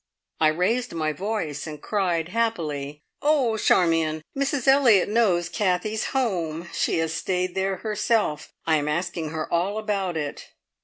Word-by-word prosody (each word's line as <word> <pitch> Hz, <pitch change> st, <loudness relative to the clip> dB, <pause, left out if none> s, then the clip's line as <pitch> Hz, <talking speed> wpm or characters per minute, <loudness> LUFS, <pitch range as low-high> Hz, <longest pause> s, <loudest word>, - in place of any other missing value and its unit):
I 155 Hz, -, +5 dB
raised 185 Hz, +8 st, 0 dB
my 155 Hz, -1 st, 0 dB
voice, 190 Hz, -6 st, -3 dB
and 150 Hz, -1 st, -7 dB
cried 175 Hz, -3 st, -1 dB
happily: 155 Hz, -10 st, -2 dB, 0.2 s
"Oh, 280 Hz, -7 st, +2 dB
Charmion! 165 Hz, -6 st, +2 dB
Mrs 275 Hz, -1 st, -1 dB
Elliott 260 Hz, -8 st, +6 dB
knows 200 Hz, -6 st, +2 dB
Kathie's 205 Hz, +2 st, 0 dB
home. 175 Hz, -, -1 dB
She -, -, 0 dB
has 165 Hz, 0 st, 0 dB
stayed 180 Hz, +1 st, -1 dB
there 190 Hz, 0 st, 0 dB
herself. 210 Hz, -7 st, -1 dB
I 160 Hz, -1 st, +3 dB
am 145 Hz, 0 st, -2 dB
asking 160 Hz, 0 st, -2 dB
her 155 Hz, 0 st, -4 dB
all 185 Hz, +5 st, +1 dB
about 200 Hz, -5 st, -1 dB
it." 145 Hz, -2 st, -5 dB
180 Hz, 145 wpm, -25 LUFS, 160-220 Hz, 0.2 s, Elliott